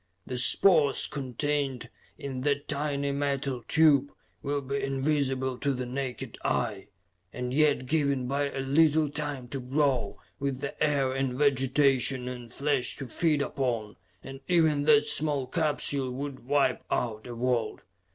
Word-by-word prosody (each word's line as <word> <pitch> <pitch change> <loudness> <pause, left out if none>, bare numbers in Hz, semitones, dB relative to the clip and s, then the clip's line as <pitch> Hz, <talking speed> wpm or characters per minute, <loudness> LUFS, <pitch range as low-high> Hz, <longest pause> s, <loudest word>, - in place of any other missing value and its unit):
The 125 -1 -3
spores 145 +1 +4
contained 135 -2 -2 0.3
in 135 -2 -5
that 145 +1 0
tiny 140 -1 -1
metal 140 -3 -2
tube 145 -3 +4 0.3
would 140 -2 -3
be 140 +1 -1
invisible 135 -2 0
to 140 - 0
the 125 -1 -3
naked 130 -1 -5
eye 105 -5 -1 0.4
and 125 0 -4
yet 145 -2 +3
given 140 -3 0
but 140 +1 -1
a - - -1
little 150 +2 +3
time 145 -4 -4
to 135 - -4
grow, 130 -4 0 0.2
with 140 -1 -2
air 140 -3 +1
and 135 -1 -1
vegetation 135 -2 +2
and 120 -2 -7
flesh 140 -1 0
to 135 - -6
feed 150 +3 +1
upon, 115 -7 -2 0.3
and 135 0 -8
even 160 -5 +3
that 150 -1 +5
small 145 -3 +1
capsule 145 -2 0
would 130 -1 -6
wipe 140 -2 +2
out 110 -1 -2
a 120 - -7
world. 120 -2 -1
135 Hz, 140 wpm, -28 LUFS, 125-145 Hz, 0.4 s, that